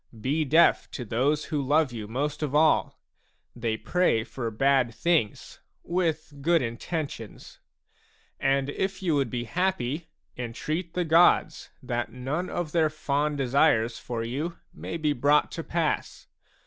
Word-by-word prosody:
Be 145 Hz, +7 st, 0 dB
deaf 160 Hz, +5 st, +4 dB
to 125 Hz, -, -5 dB
those 140 Hz, +8 st, 0 dB
who 150 Hz, -2 st, -2 dB
love 145 Hz, 0 st, +2 dB
you 110 Hz, -3 st, -6 dB
most 145 Hz, +7 st, -2 dB
of 145 Hz, -2 st, -2 dB
all; 155 Hz, +1 st, +3 dB, 0.6 s
they 115 Hz, -2 st, -2 dB
pray 180 Hz, -10 st, +1 dB
for 115 Hz, +1 st, -4 dB
bad 125 Hz, 0 st, +2 dB
things 155 Hz, -5 st, 0 dB, 0.2 s
with 165 Hz, -4 st, -1 dB
good 165 Hz, 0 st, +3 dB
intentions. 115 Hz, 0 st, -5 dB, 0.8 s
And, 135 Hz, +1 st, +1 dB
if 190 Hz, +3 st, -3 dB
you 170 Hz, -4 st, +2 dB
would 140 Hz, -4 st, +1 dB
be 120 Hz, 0 st, -3 dB
happy, 160 Hz, -, -1 dB, 0.3 s
entreat 155 Hz, +8 st, -4 dB
the 180 Hz, -1 st, 0 dB
gods 165 Hz, +2 st, +4 dB
that 120 Hz, 0 st, -2 dB
none 140 Hz, +8 st, -3 dB
of 175 Hz, -3 st, -3 dB
their 160 Hz, -2 st, +3 dB
fond 150 Hz, -1 st, -1 dB
desires 125 Hz, -4 st, +2 dB
for 115 Hz, -2 st, -4 dB
you 145 Hz, +9 st, -3 dB, 0.2 s
may 165 Hz, -, -5 dB
be 155 Hz, -2 st, +1 dB
brought 145 Hz, +3 st, +3 dB
to 165 Hz, -, -5 dB
pass. 165 Hz, -2 st, -2 dB
145 Hz, 145 wpm, -27 LUFS, 120-160 Hz, 0.8 s, deaf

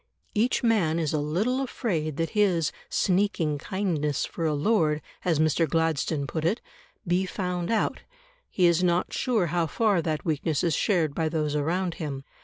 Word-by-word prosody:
Each 235 Hz, +5 st, +1 dB
man 200 Hz, -9 st, +2 dB
is 160 Hz, -3 st, -1 dB
a 155 Hz, -, +1 dB
little 200 Hz, -, 0 dB
afraid 165 Hz, -, -2 dB
that 165 Hz, 0 st, -1 dB
his 185 Hz, -7 st, +2 dB, 0.2 s
"sneaking 180 Hz, -6 st, +1 dB
kindness 160 Hz, -6 st, -1 dB
for 165 Hz, -2 st, -3 dB
a 150 Hz, -, +1 dB
lord," 155 Hz, -2 st, +2 dB, 0.2 s
as 170 Hz, -4 st, +2 dB
Mr. 155 Hz, +1 st, +2 dB
Gladstone 160 Hz, -2 st, 0 dB
put 155 Hz, +3 st, -4 dB
it, 185 Hz, +9 st, +1 dB, 0.5 s
be 180 Hz, +2 st, +1 dB
found 180 Hz, -2 st, -3 dB
out; 225 Hz, -, 0 dB, 0.5 s
he 180 Hz, -, +2 dB
is 170 Hz, +1 st, +4 dB
not 175 Hz, 0 st, +1 dB
sure 230 Hz, -8 st, +1 dB
how 170 Hz, -2 st, +1 dB
far 205 Hz, +1 st, +2 dB
that 155 Hz, -1 st, -2 dB
weakness 155 Hz, -2 st, 0 dB
is 170 Hz, -2 st, +2 dB
shared 165 Hz, -4 st, +1 dB
by 160 Hz, +1 st, 0 dB
those 155 Hz, -2 st, -1 dB
around 170 Hz, +4 st, 0 dB
him. 140 Hz, -3 st, -4 dB
165 Hz, 170 wpm, -26 LUFS, 155-190 Hz, 0.5 s, is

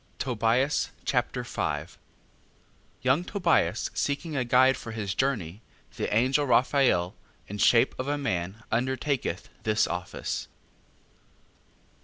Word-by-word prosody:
Tobias 125 Hz, +3 st, +1 dB, 0.2 s
Chapter -, -, 0 dB
5 -, -, -3 dB, 1.0 s
Young 130 Hz, +6 st, +3 dB
Tobias 180 Hz, -3 st, +1 dB
seeking 145 Hz, +2 st, -2 dB
a 130 Hz, -, +1 dB
guide 130 Hz, +2 st, +5 dB
for 115 Hz, -2 st, -8 dB
his 100 Hz, -3 st, -3 dB
journey, 110 Hz, -8 st, -1 dB, 0.3 s
the -, -, -3 dB
angel 130 Hz, +6 st, +2 dB
Raphael, 125 Hz, -7 st, +3 dB, 0.3 s
in 105 Hz, +1 st, -6 dB
shape 115 Hz, +2 st, +5 dB
of 130 Hz, -, -2 dB
a 145 Hz, 0 st, 0 dB
man, 95 Hz, -5 st, -3 dB
undertaketh 130 Hz, +3 st, -1 dB
this 110 Hz, 0 st, +2 dB
office. 90 Hz, +1 st, -4 dB
125 Hz, 110 wpm, -27 LUFS, 110-140 Hz, 1.0 s, guide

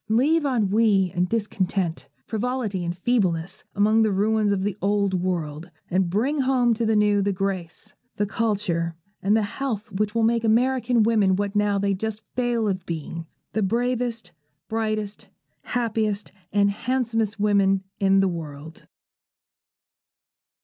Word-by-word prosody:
Leave 290 Hz, +7 st, +3 dB
ennui 210 Hz, -5 st, +2 dB
and 180 Hz, 0 st, 0 dB
discontent, 195 Hz, -5 st, -1 dB, 0.2 s
frivolity 225 Hz, -4 st, -2 dB
and 175 Hz, 0 st, -3 dB
feebleness, 185 Hz, -5 st, 0 dB
among 215 Hz, +2 st, +4 dB
the 215 Hz, -1 st, +3 dB
ruins 210 Hz, +2 st, +2 dB
of 195 Hz, -1 st, 0 dB
the 205 Hz, -2 st, -1 dB
Old 200 Hz, 0 st, +1 dB
World, 175 Hz, -3 st, -2 dB, 0.2 s
and 185 Hz, 0 st, +2 dB
bring 255 Hz, -, 0 dB
home 255 Hz, -3 st, +3 dB
to 225 Hz, 0 st, -1 dB
the 220 Hz, -, +2 dB
New 210 Hz, -1 st, +3 dB
the 200 Hz, +1 st, +1 dB
grace, 195 Hz, +1 st, -4 dB, 0.2 s
the 205 Hz, -, 0 dB
culture, 195 Hz, -6 st, -1 dB, 0.3 s
and 205 Hz, +3 st, +3 dB
the 220 Hz, -, +1 dB
health 230 Hz, 0 st, -4 dB
which 205 Hz, +2 st, -1 dB
will 230 Hz, -, +2 dB
make 230 Hz, +1 st, +2 dB
American 245 Hz, +1 st, +3 dB
women 210 Hz, -4 st, +3 dB
what 200 Hz, +1 st, -2 dB
now 205 Hz, -1 st, +2 dB
they 200 Hz, 0 st, +1 dB
just 220 Hz, +2 st, -4 dB
fail 240 Hz, -3 st, +1 dB
of 190 Hz, -2 st, -1 dB
being, 165 Hz, 0 st, -5 dB, 0.3 s
the 220 Hz, -, 0 dB
bravest, 235 Hz, -1 st, -1 dB, 0.4 s
brightest, 215 Hz, -2 st, -3 dB, 0.4 s
happiest, 220 Hz, -4 st, -1 dB, 0.2 s
and 200 Hz, 0 st, +3 dB
handsomest 225 Hz, -2 st, -1 dB
women 200 Hz, -2 st, +3 dB, 0.2 s
in 195 Hz, -1 st, +4 dB
the 195 Hz, -, +3 dB
world. 160 Hz, -3 st, -7 dB
205 Hz, 140 wpm, -24 LUFS, 190-225 Hz, 0.4 s, among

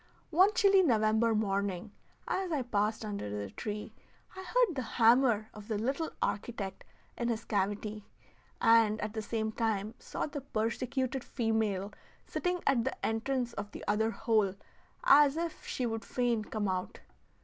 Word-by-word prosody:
One 370 Hz, +6 st, +6 dB
chilly 395 Hz, -3 st, +6 dB
November 220 Hz, -5 st, +3 dB
morning, 200 Hz, -2 st, -1 dB, 0.4 s
as 375 Hz, -2 st, -1 dB
I 290 Hz, -5 st, 0 dB
passed 215 Hz, -1 st, 0 dB
under 200 Hz, -, -4 dB
the 100 Hz, -1 st, -4 dB
tree, 210 Hz, -, -5 dB, 0.4 s
I 375 Hz, -, -6 dB
heard 450 Hz, +2 st, +2 dB
the 260 Hz, -, -1 dB
hammer 230 Hz, -2 st, +3 dB
of 210 Hz, -1 st, -11 dB
the 220 Hz, -, -1 dB
little 275 Hz, +9 st, -1 dB
architect 200 Hz, -2 st, -3 dB, 0.4 s
in 235 Hz, -, 0 dB
his 230 Hz, -1 st, -2 dB
cavity, 205 Hz, +1 st, -2 dB, 0.5 s
and 225 Hz, -2 st, +5 dB
at 210 Hz, 0 st, -3 dB
the 220 Hz, -, -2 dB
same 220 Hz, 0 st, -2 dB
time 220 Hz, -2 st, -1 dB
saw -, -, -4 dB
the 290 Hz, -1 st, -5 dB
persecuted 255 Hz, +2 st, -2 dB
female 215 Hz, -4 st, -1 dB, 0.3 s
sitting 360 Hz, -1 st, -2 dB
at 255 Hz, -4 st, +3 dB
the 265 Hz, -, -3 dB
entrance 240 Hz, +2 st, -1 dB
of 205 Hz, 0 st, -5 dB
the -, -, -8 dB
other 220 Hz, +2 st, +2 dB
hole 215 Hz, -4 st, +1 dB, 0.5 s
as 295 Hz, -, +6 dB
if 335 Hz, -1 st, -4 dB
she 255 Hz, -, -2 dB
would 225 Hz, -1 st, -2 dB
fain 240 Hz, -3 st, 0 dB
come 210 Hz, -1 st, -2 dB
out. 185 Hz, -1 st, -3 dB
225 Hz, 155 wpm, -31 LUFS, 210-260 Hz, 0.5 s, One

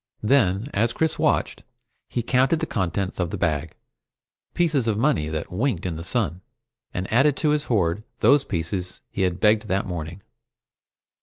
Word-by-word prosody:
Then, 105 Hz, -4 st, +3 dB
as 115 Hz, +3 st, +1 dB
Chris 160 Hz, +4 st, 0 dB
watched, -, -, +1 dB, 0.5 s
he 120 Hz, -, -2 dB
counted 130 Hz, +6 st, +2 dB
the 160 Hz, -, -1 dB
contents 95 Hz, -, -2 dB
of 90 Hz, -2 st, 0 dB
the -, -, -4 dB
bag, 80 Hz, -2 st, -1 dB, 0.8 s
pieces 155 Hz, -8 st, +1 dB
of 110 Hz, -2 st, +1 dB
money 115 Hz, -, +1 dB
that 80 Hz, 0 st, -4 dB
winked 100 Hz, -1 st, -1 dB
in 85 Hz, -3 st, -2 dB
the 80 Hz, -, -6 dB
sun, 95 Hz, -3 st, -1 dB, 0.5 s
and 95 Hz, +3 st, -4 dB
added 135 Hz, +4 st, +4 dB
to 155 Hz, -, +1 dB
his 150 Hz, -1 st, 0 dB
horde 95 Hz, -4 st, +1 dB, 0.2 s
those 135 Hz, +5 st, +5 dB
pieces 90 Hz, -2 st, -3 dB
he 100 Hz, -, -3 dB
had 90 Hz, -1 st, 0 dB
begged 110 Hz, 0 st, +3 dB
that 95 Hz, 0 st, 0 dB
morning. 85 Hz, 0 st, -6 dB
100 Hz, 165 wpm, -24 LUFS, 90-125 Hz, 0.8 s, those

